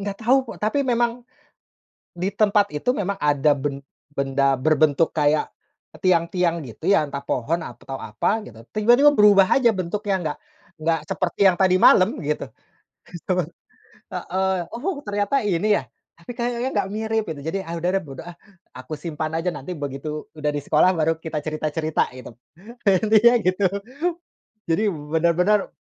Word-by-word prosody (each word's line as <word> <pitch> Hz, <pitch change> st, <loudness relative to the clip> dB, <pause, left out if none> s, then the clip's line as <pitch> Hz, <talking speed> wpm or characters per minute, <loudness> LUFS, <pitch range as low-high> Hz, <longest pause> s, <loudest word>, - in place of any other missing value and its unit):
nggak 200 Hz, 0 st, -5 dB
tahu, 250 Hz, +4 st, +4 dB, 0.2 s
kok -, -, -14 dB
tapi 280 Hz, +7 st, +1 dB
memang, 240 Hz, 0 st, 0 dB, 0.9 s
di 185 Hz, +3 st, -1 dB
tempat 205 Hz, -1 st, +2 dB
itu, 150 Hz, +11 st, -2 dB
memang 200 Hz, 0 st, -2 dB
ada 145 Hz, 0 st, +3 dB
ben 140 Hz, 0 st, -4 dB, 0.3 s
benda 140 Hz, 0 st, +1 dB
berbentuk 155 Hz, +2 st, +2 dB
kayak 150 Hz, 0 st, +1 dB, 0.5 s
tiang-tiang 170 Hz, -2 st, +1 dB
gitu, 130 Hz, -, -8 dB
ya. 200 Hz, -6 st, +4 dB
Entah 140 Hz, 0 st, -5 dB
pohon 160 Hz, +8 st, -1 dB
atau 135 Hz, -1 st, -8 dB
apa, 200 Hz, -, -1 dB
gitu. 115 Hz, 0 st, -13 dB
Tiba-tiba 240 Hz, +7 st, +5 dB
berubah 200 Hz, -2 st, +6 dB
aja 240 Hz, -3 st, +4 dB
bentuknya, 195 Hz, +2 st, -2 dB
nggak 150 Hz, -1 st, -3 dB, 0.4 s
nggak 165 Hz, 0 st, +1 dB
seperti 185 Hz, +2 st, 0 dB
yang 175 Hz, -, -5 dB
tadi 185 Hz, -1 st, +4 dB
malam, 185 Hz, +5 st, +6 dB
gitu. 150 Hz, +1 st, -2 dB, 0.6 s
Betul. -, -, -2 dB, 0.7 s
Heeh. 190 Hz, +1 st, -1 dB, 0.2 s
"Oh, 290 Hz, +5 st, -3 dB
ternyata 205 Hz, +6 st, 0 dB
ini, 205 Hz, +3 st, +2 dB
ya. -, -, -9 dB, 0.3 s
Tapi 170 Hz, -, -19 dB
kayaknya 240 Hz, +1 st, -1 dB
nggak 195 Hz, -, 0 dB
mirip." 220 Hz, 0 st, -1 dB
Gitu, 145 Hz, -3 st, -6 dB
jadi, 195 Hz, +3 st, -2 dB
"Ah, 170 Hz, -, -5 dB
udah 175 Hz, +2 st, 0 dB
deh, 195 Hz, -, 0 dB
bodo 135 Hz, -3 st, -9 dB
ah!" 175 Hz, -1 st, -10 dB, 0.4 s
Aku 130 Hz, +4 st, -8 dB
simpan 155 Hz, -1 st, -4 dB
aja, 175 Hz, +2 st, -1 dB
nanti 160 Hz, +7 st, -7 dB
begitu 145 Hz, +2 st, -5 dB
udah 150 Hz, -1 st, -1 dB
di 145 Hz, -, -2 dB
sekolah, 155 Hz, +6 st, +4 dB
baru 160 Hz, 0 st, +1 dB
kita 160 Hz, -2 st, -3 dB
cerita-cerita, 155 Hz, 0 st, -1 dB
gitu. 125 Hz, -, -10 dB, 0.6 s
Intinya 215 Hz, +5 st, +5 dB
gitu. 185 Hz, +2 st, +1 dB, 1.0 s
Jadi, 165 Hz, +7 st, +2 dB, 0.3 s
benar-benar 180 Hz, +5 st, +2 dB
175 Hz, 155 wpm, -22 LUFS, 150-205 Hz, 1.0 s, berubah